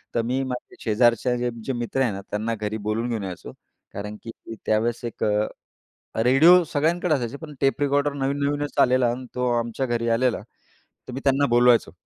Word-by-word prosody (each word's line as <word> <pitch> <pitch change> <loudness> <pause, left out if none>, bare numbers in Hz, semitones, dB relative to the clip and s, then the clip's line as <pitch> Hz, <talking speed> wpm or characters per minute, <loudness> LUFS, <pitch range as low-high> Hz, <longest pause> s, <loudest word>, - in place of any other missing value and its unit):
तर 115 - +3
मी 125 +3 -1
माझ्या 125 -1 -6
शेजारच्या 120 +2 +2
जे, 120 0 -1
जे 135 - -2
मित्र 120 +2 -2
आहे 125 -5 +2
ना, 100 0 -6
त्यांना 110 +2 -2
घरी 105 0 -3
बोलून 115 +3 -1
घेऊन 110 -4 -2
यायचो. 90 -2 -7 0.4
कारण 105 +1 -6
की 115 - -7 0.3
त्यावेळेस 115 +2 0
एक 115 - -5
अ, 105 0 +1 0.8
रेडिओ 165 +8 +6
सगळ्यांकडे 165 +3 0
असायचे. 125 0 -3
पण 155 -1 -10
टेप 135 +2 +1
रेकॉर्डर 145 0 +1
नवीन-नवीनच 140 +1 -2
आलेला 125 -1 +4
आणि 125 +1 -6
तो 125 0 0
आमच्या 120 +3 -2
घरी 120 -1 -1
आलेला. 120 +1 +1 0.7
तर 125 - -7
मी 130 - -4
त्यांना 140 +1 +3
बोलवायचो, 120 0 +4
125 Hz, 180 wpm, -24 LUFS, 115-140 Hz, 0.8 s, रेडिओ